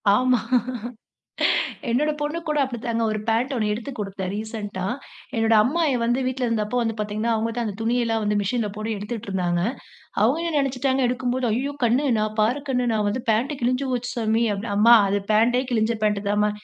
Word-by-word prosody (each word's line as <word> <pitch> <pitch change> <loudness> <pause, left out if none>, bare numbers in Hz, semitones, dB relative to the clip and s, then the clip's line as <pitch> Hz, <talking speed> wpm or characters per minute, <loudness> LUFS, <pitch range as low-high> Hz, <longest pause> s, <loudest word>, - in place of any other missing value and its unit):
ஆமா 255 +1 +3 1.5
என்னோட 295 +6 +2
பொண்ணு 295 +3 -2
கூட 300 - 0
அப்பிடித்தாங்க. 235 -3 -2
ஒரு 215 - -2
பேண்ட் 240 +5 +1
ஒண்ணு 215 -3 0
எடுத்து 240 +6 -5
குடுத்தேன், 195 -2 -4
ரீசென்ட்டா 210 -3 -4 0.5
என்னோட 225 0 +3
அம்மாயி 290 +2 +1
வந்து 240 +2 +1
வீட்ல 255 -1 -1
இருந்தப்போ 225 +1 -1
வந்து 225 -1 -1
பாத்தீங்கன்னா, 210 +2 -1
அவுங்க 225 +1 -1
தான் 240 -1 -1
அந்த 205 - -5
துணியெல்லாம் 230 -1 +1
வந்து 210 0 +1
மிஷினில 215 +2 -1
போட்டு 215 +1 -3
எடுத்துட்டு 210 +2 -6
இருந்தாங்க. 175 -2 0 0.6
அவுங்க 265 +9 +3
என்ன 310 - -1
நினைச்சுட்டாங்க 270 0 0
எடுக்கும்போது, 250 0 -1
ஐய்யயோ! 275 +5 -1
கண்ணு 250 +5 +2
நான் 215 0 -1
பாரு, 240 +7 +2
கண்ணு 250 -1 +1
நான் 210 -1 +1
வந்து 235 +4 -2
பேண்ட் 240 +7 +1
கிழிஞ்சு 255 +3 +1
போச்சு 245 0 -2
சாமி, 225 0 +1
அப்படி 205 +2 -5
அம்மா 230 +3 +7
அது 200 +1 +1
பேண்டே 240 +4 +3
கிழிஞ்ச 225 -1 +2
பேண்ட்டு 210 -1 0
தாம்மா. 210 +1 +2
230 Hz, 175 wpm, -23 LUFS, 215-250 Hz, 1.5 s, அம்மா